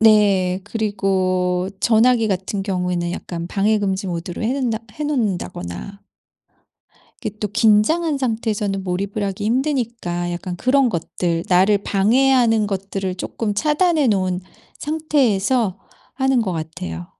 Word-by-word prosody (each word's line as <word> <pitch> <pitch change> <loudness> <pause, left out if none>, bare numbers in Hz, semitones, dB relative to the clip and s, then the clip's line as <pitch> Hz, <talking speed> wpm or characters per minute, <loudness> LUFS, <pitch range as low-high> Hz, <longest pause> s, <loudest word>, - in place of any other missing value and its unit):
네 200 -4 +4
그리고 190 -4 0
전화기 230 0 +4
같은 195 +1 -2
경우에는 180 -3 -1
약간 170 -1 -5
방해금지 200 0 0
모드로 175 +2 -4
해 230 +4 +1
놓는다 245 -5 -1
해 300 - -5
놓는다거나 200 - -3 1.2
이게 215 - -2
또 210 - -2
긴장한 260 - +3
상태에서는 215 -5 -1
몰입을 195 +3 -2
하기 200 +1 -3
힘드니까 230 - -1
약간 180 +1 -5
그런 260 +4 +3
것들 170 -2 -2
나를 190 +3 +4
방해하는 225 +2 +3
것들을 195 -1 -3
쪼끔 210 +2 -3
차단해 305 - +2
놓은 185 -3 +1 0.4
상태에서 255 - +1 0.4
하는 265 -2 +2
것 190 -4 -2
같아요. 90 - -5
205 Hz, 295 characters per minute, -20 LUFS, 185-235 Hz, 1.2 s, 네